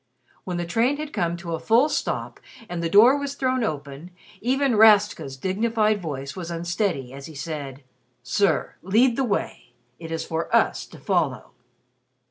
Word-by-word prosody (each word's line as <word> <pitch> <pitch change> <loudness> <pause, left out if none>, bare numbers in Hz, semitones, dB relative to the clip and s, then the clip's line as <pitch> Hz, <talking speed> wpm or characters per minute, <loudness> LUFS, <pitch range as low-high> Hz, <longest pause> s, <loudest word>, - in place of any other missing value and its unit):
When 180 -2 -3
the 175 - -2
train 230 +11 +1
had 300 0 -6
come 170 0 -1
to 170 -1 -6
a 165 - -2
full 235 +6 +4
stop, 300 - -3 0.3
and 175 -1 -4
the 165 - -1
door 225 +9 +7
was 280 -1 -4
thrown 255 -3 0
open, 145 -2 -5 0.3
even 265 +1 +1
Rastka's 210 -10 +4
dignified 215 - 0
voice 140 -4 -5
was 175 -3 -6
unsteady 170 - -2
as 140 +2 -9
he 160 - -12
said, 140 -2 -6 0.4
"Sir, 155 +5 +1
lead 230 +7 +3
the 270 - 0
way. 200 - -3 0.3
It 165 -1 -8
is 165 0 -3
for 165 +1 -3
us - - +1
to - - -14
follow." - - -1
180 Hz, 165 wpm, -24 LUFS, 160-230 Hz, 0.4 s, door